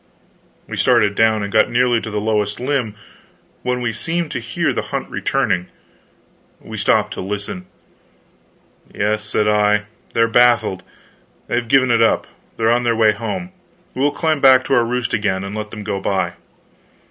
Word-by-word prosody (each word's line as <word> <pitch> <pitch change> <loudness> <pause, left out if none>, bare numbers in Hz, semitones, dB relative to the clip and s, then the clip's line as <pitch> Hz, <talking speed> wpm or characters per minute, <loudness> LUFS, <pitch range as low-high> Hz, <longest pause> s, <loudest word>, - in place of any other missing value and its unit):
We - - -6
started 115 -5 +3
down, 110 0 +2
and 100 +1 -5
got 110 - +4
nearly 120 -1 +2
to 110 - -6
the 105 -1 -2
lowest 105 -1 -1
limb, 125 -5 -1 0.7
when 125 0 -2
we 120 -1 -1
seemed 165 +3 -2
to 125 - -3
hear 115 0 -1
the - - -1
hunt - - -3
returning. 90 0 0 0.9
We - - -9
stopped - - +1
to - - -6
listen. 105 - -5 1.2
"Yes," 105 +1 -1
said 105 0 0
I, 105 0 +3 0.3
"they're 115 0 +4
baffled, 120 -5 +3 0.6
they've 120 0 -2
given 130 0 +3
it 115 -1 +3
up, 115 - +3 0.3
they're 115 0 +2
on 120 +1 +2
their 120 -1 +1
way 110 -1 +4
home. 180 - -5 0.4
We 130 - -4
will 145 - +4
climb 155 0 -1
back 130 -1 +6
to - - -1
our 120 -2 +4
roost 125 +1 -2
again, 100 -3 0
and 100 +2 -6
let 105 0 -5
them 105 -1 -8
go 100 -1 -3
by." 95 -3 -1
115 Hz, 170 wpm, -19 LUFS, 105-125 Hz, 1.2 s, back